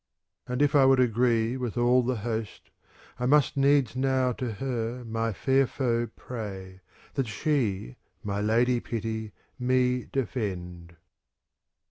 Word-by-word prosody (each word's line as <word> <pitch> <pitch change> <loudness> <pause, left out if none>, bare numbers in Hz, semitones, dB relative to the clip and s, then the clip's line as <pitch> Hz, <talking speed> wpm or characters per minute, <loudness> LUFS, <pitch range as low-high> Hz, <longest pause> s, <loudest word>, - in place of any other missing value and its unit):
And 125 +3 0
if 145 - +2
I 145 -2 +6
would 135 -1 +5
agree 120 0 +2
with 125 -2 -4
all 120 +1 +4
the 125 +1 -1
host, 110 -3 -4 0.5
I 125 - 0
must 145 +1 +4
needs 140 -3 +3
now 130 -1 +1
to 120 -1 -4
her 120 +1 -3
my 115 0 -1
fair 135 +5 +2
foe 120 -3 -1
pray, 95 -6 -7 0.3
That 135 -3 -1
she, 105 - -1 0.3
my 100 0 -2
Lady 120 +3 +2
Pity, 110 -2 -4 0.3
me 125 0 +1
defend. 90 -9 -4
120 Hz, 130 wpm, -27 LUFS, 110-130 Hz, 0.5 s, I